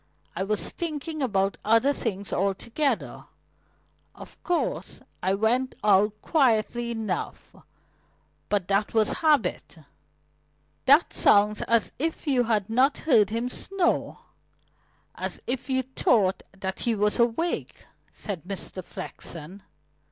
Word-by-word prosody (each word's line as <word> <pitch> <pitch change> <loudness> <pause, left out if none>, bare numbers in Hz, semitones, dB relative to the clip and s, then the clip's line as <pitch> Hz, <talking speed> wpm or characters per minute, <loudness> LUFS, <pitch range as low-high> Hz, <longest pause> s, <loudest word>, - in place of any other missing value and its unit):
I 185 - -3
was 210 +2 +2
thinking 310 -1 -4
about 195 -6 0
other 230 +6 +3
things 200 -6 -4
altogether. 225 - -1 0.9
Of - - -10
course, 355 -2 -2 0.2
I 190 +1 +1
went 240 +5 +1
out 210 +1 +3
quietly 240 -5 +1
enough. 220 -5 -4 0.9
But 200 -4 0
that 200 +3 0
was 220 -1 +2
habit." 290 - +1 1.1
"That 285 +5 +5
sounds 210 +1 +4
as 230 -1 +1
if 320 +3 -2
you 260 -5 +2
had 215 -3 0
not 255 +5 +2
heard 225 -10 +5
him 230 +3 -2
snore 370 +7 -1 1.0
as - - -5
if 255 +2 -3
you 260 0 +1
thought 220 -6 +1 0.2
that 190 0 -4
he 235 -2 0
was 210 +3 +1
awake," 240 +9 -1 0.3
said 195 -7 -6
Mr. 190 0 -5
Flexen. 170 +3 -8
225 Hz, 115 wpm, -26 LUFS, 200-265 Hz, 1.1 s, That